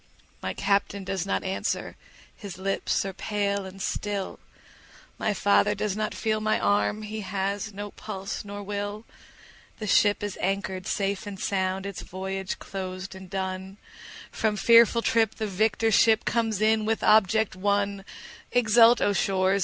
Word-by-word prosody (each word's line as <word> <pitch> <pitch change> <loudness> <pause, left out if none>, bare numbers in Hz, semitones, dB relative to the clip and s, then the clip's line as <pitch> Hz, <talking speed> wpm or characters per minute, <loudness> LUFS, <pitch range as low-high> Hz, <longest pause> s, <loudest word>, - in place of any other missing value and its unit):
My - - -3
Captain 200 0 0
does 190 -1 -3
not - - 0
answer, 190 0 -2 0.4
his 200 -5 -8
lips 195 +1 -1
are 195 - -4
pale 200 0 -2
and 190 +1 -11
still, 200 0 -3 0.8
My 215 - +1
father 205 +1 +3
does 205 -1 -2
not 215 0 -2
feel 215 -1 -1
my 215 0 +1
arm, 105 - +1
he 215 +1 -5
has 200 +2 -2
no 205 0 -7
pulse 195 -2 -6
nor 205 0 -7
will; 205 +2 -4 0.7
The 215 - -5
ship 205 +1 +3
is 205 -1 -4
anchor'd 190 0 -2
safe 200 0 -1
and 195 -2 -7
sound, 190 0 -1
its 200 -2 -5
voyage 190 +1 -4
closed 185 0 -6
and 190 -1 -11
done, 190 0 -4 0.5
From 220 -1 0
fearful 230 +1 +6
trip 225 -2 +2
the 220 - -3
victor 215 +3 +1
ship 220 +1 +4
comes 225 -3 0
in 220 0 +3
with 220 +1 0
object 215 0 +4
won; 200 +1 0 0.5
20 245 - +3
Exult, 230 +1 +6
O 205 - +3
shores! 190 +1 +2
200 Hz, 155 wpm, -26 LUFS, 190-215 Hz, 0.8 s, fearful